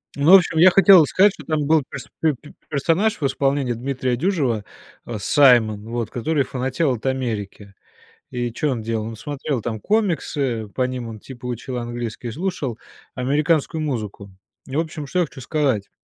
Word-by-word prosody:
Ну, 145 +5 +3
в - - +13
общем, 170 -3 +4
я 180 +3 +7
хотел 190 -4 +7
сказать, 195 +6 +4
что 150 - -12
там 155 -2 -1
был 155 -1 +3
перс 135 0 -8
пе 160 -2 +3
пе 150 - -15 0.2
персонаж 165 +9 +1
в - - +1
исполнении 135 -1 0
Дмитрия 130 0 -2
Дюжева, 135 - 0 0.4
э, 115 -3 -5
Саймон, 110 -4 +4
вот, 115 -1 -3
который 140 +4 0
фанател 130 +4 -1
от 115 +2 -7
Америки. 105 -6 -3 0.6
И 120 -1 -2
чё 145 +4 -1
он 115 -3 -3
делал? 110 -1 -2
Он 115 0 -6
смотрел 140 0 -4
там 110 -1 -4
комиксы, 145 - -1
по 130 - -3
ним 125 -2 -5
он 110 -1 -9
типа 125 +1 -11
учил 125 +1 -4
английский, 120 -1 -5
и - - -5
слушал 150 - -3 0.3
американскую 150 +4 0
музыку. 105 -8 -4 0.4
И 135 - -6
в - - +2
общем, 155 -2 -4
что 180 +6 -2
я 175 - +3
хочу 130 -1 -12
сказать. 130 -8 -1
130 Hz, 185 wpm, -21 LUFS, 120-155 Hz, 0.6 s, в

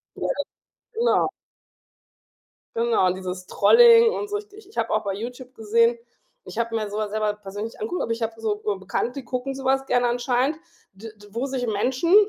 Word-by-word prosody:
Ja, - - -3 0.7
genau. 470 +2 +2 1.5
Genau, 230 -4 +2
und 185 - +1
dieses 185 -1 -6
Trolling 465 - +7
und 415 - -3
so. 415 0 -1
Ich 415 -1 -14
ich 435 - -11
habe - - 0
auch - - +1
bei 195 - -2
Youtube 245 +4 -7
gesehen 230 +2 +2 0.5
ich - - -10
habe 230 -1 -1
mir 215 -2 -1
so 205 - -6
was 215 -1 -2
selber 215 0 0
persönlich 210 +2 -7
nicht - - -17
angeguckt, 360 -5 -3
aber 230 - -1
ich 230 - -4
habe 225 0 -3
so 215 -2 0 0.2
Bekannte, 200 +5 -2
die 275 -1 -7
gucken 260 +2 -3
so 270 -1 -7
was 270 0 +2
gerne 245 -2 +2
anscheinend, 245 +4 +1 0.4
d 215 +3 -10 0.2
wo 235 +5 -2
sich 260 -2 -2
Menschen, 255 - +1
235 Hz, 190 wpm, -24 LUFS, 215-270 Hz, 1.5 s, Trolling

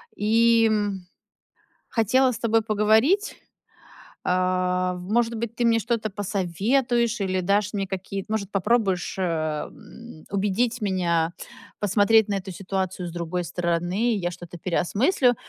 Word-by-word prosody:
и, 230 +2 +4
м, 205 -4 -2 0.8
хотела 250 +4 +2
с 225 - -6
тобой 225 -1 +2
поговорить. 220 - +2 0.9
А, 185 0 +1
в 180 +2 -8
может 235 0 +2
быть, 230 +1 -4
ты 240 - 0
мне 230 -1 +4
что-то 225 -1 -1
посоветуешь 210 +5 0
или 185 -1 0
дашь 200 +2 +1
мне 195 -1 -1
какие-то 195 +2 -5
может, 205 -3 -2
попробуешь, 195 -2 0
э, - - 0
м, 155 +4 -5
убедить 210 +5 0
меня 175 -4 0 0.5
посмотреть 205 +2 +4
на 205 - -1
эту 190 0 -5
ситуацию 185 -1 -3
с - - -8
другой 170 +1 -3
стороны. 175 +6 0
Я 175 -3 -2
что-то 175 0 -10
переосмыслю. 245 - +1
200 Hz, 130 wpm, -24 LUFS, 180-225 Hz, 0.9 s, и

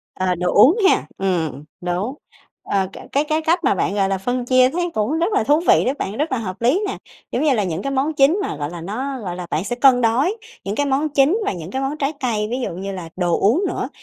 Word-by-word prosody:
Ờ, 185 -1 0
đồ 180 +1 -1
uống 285 - +6
ha, - - +2
ừm, 165 -8 -1 0.2
đúng. 180 +7 -2 0.5
Ờ, 195 -1 0 0.2
cái 285 +2 +2
cái 310 +1 0
cách 330 +3 +2
mà - - +3
bạn, 185 - 0
gọi 195 -1 +1
là, 195 - 0
phân 245 +5 -2
chia 255 0 +4
thấy 350 +4 -2
cũng 235 +10 0
rất 355 +6 0
là 400 - +2
thú 295 +2 +3
vị 335 - +4
đấy 260 - +1
bạn, 200 +3 -3
rất 300 +3 -1
là 260 - +1
hợp 195 -2 -5
lý 260 - +3
nè, - - -4 0.3
kiểu - - -1
như 300 -2 +3
là, 215 -4 +1
những 175 -2 -3
cái 275 - -3
món 275 +4 0
chính 295 +6 +4
mà, 390 - -3
gọi 145 0 -3
là, 170 0 -8
nó 255 +9 -4
gọi 180 -4 -4
là, 180 - -6
bạn 160 - -1
sẽ 220 +5 -3
cân 250 0 +5
đối 260 - +2 0.3
những 200 +1 -3
cái 285 - +1
món 280 +3 0
chính 285 +7 +3
và - - 0
những 175 0 -8
cái 265 - -2
món 275 +3 -2
trái 280 +1 -1
cây 220 -6 -1
ví 250 - -1
dụ - - -2
như 195 +3 -5
là 180 -4 -7
đồ 175 -2 0
uống 245 - +3
nữa, - - -3
245 Hz, 270 wpm, -20 LUFS, 190-285 Hz, 0.5 s, uống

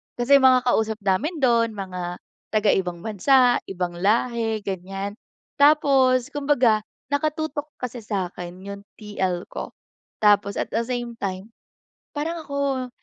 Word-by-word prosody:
Kasi 270 +3 +5
mga 260 -1 +5
kausap 220 -3 +1
namin 205 - 0
doon 230 -3 +3
mga 180 -3 -5 0.4
taga-ibang 190 -5 +1
bansa, 245 +4 +3
ibang 175 -2 -4
lahi, 225 +2 +1
ganyan. 195 +1 -4 0.5
Tapos, 275 -3 +4
kumbaga, 275 -7 +2 0.3
naka-tutok 305 0 -1
kasi 250 -1 -6
sakin 185 -4 -5
yung 200 0 -7
TL 190 -4 -3
ko. - - -7 0.5
Tapos 205 -1 +4
at - - -3
the 225 - +1
same 240 -2 -4
time, 190 +2 -4 0.7
parang 325 +3 -2
ako, 280 -3 -2
230 Hz, 120 wpm, -23 LUFS, 195-265 Hz, 0.7 s, Kasi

